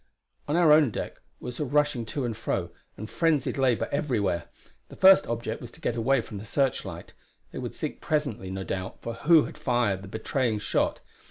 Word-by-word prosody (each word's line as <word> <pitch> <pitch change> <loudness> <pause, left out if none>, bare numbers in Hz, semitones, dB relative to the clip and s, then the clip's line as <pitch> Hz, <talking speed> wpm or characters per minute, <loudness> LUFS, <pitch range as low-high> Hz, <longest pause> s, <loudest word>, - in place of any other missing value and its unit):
On 145 - 0
our 170 -3 +5
own 150 -3 +6
deck - - -6 0.2
was 125 -1 -7
rushing 145 -4 +1
to 135 +3 -2
and 115 -2 -3
fro, 95 -5 -2 0.3
and 110 - -6
frenzied 155 -1 +1
labour 130 -4 +2
everywhere. 110 - 0 0.4
The - - -11
first 190 0 +7
object 115 0 -3
was 120 - -8
to - - -15
get 120 - -1
away 125 +3 +2
from 105 -2 -8
the 105 - -9
searchlight; 135 +4 -2 0.4
they - - -6
would - - -5
seek - - -5
presently, 140 -11 -1
no 95 0 -4
doubt, 95 0 -5
for 115 - -4
who 150 +7 +5
had - - -8
fired 120 -7 +1
the 100 - -10
betraying 110 +2 -1
shot. 105 - 0
120 Hz, 190 wpm, -27 LUFS, 110-145 Hz, 0.4 s, first